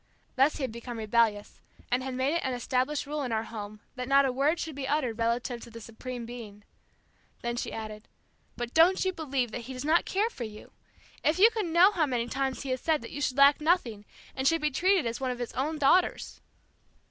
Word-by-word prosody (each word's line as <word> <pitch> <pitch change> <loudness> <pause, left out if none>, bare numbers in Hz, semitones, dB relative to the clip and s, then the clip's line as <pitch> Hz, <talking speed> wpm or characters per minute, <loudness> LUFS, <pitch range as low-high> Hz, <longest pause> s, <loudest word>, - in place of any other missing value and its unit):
Thus 275 +3 +4
he 285 - -4
had 255 - -2
become 235 +1 -7
rebellious, 215 -1 0 0.3
and 250 +1 +2
had 260 0 -4
made 260 +4 +1
it 335 - 0
an 260 -1 -1
established 255 +4 -1
rule 295 +1 -3
in 255 -4 -3
our 220 0 0
home 210 -2 -8
that 250 -1 -5
not 275 +1 +5
a 265 - +1
word 285 +6 +1
should 320 - -4
be 270 -1 -5
uttered 260 -6 -1
relative 235 +1 -1
to - - -10
the 230 0 -10
Supreme 235 +2 -7
Being. 225 -4 -9 0.8
Then 240 0 -2
she 240 - -3
added, 215 -1 -7 0.5
"But 240 0 -4
don't 355 +4 +5
you 375 - 0
believe 270 -8 -2
that 245 - -5
he 260 - -7
does 255 +2 -6
not 320 +3 +3
care 425 +4 0
for 245 - -6
you! 215 -1 -9 0.5
If 310 - +2
you 435 +5 +7
could 435 -5 -2
know 345 +4 +6
how 335 -7 +1
many 240 -3 -1
times 270 +2 -2
he 275 - -5
has 255 - -2
said 310 -5 +1
that 230 - -9
you 285 - -6
should 260 -1 -1
lack 280 +2 +6
nothing 260 - +1 0.3
and 265 0 0
should 330 +1 +3
be 300 0 +1
treated 370 +3 +2
as 230 +2 -3
one 260 - -1
of 250 - -3
his 245 -1 -5
own 300 +5 -2
daughters." 300 +5 +2
260 Hz, 230 wpm, -28 LUFS, 235-300 Hz, 0.8 s, you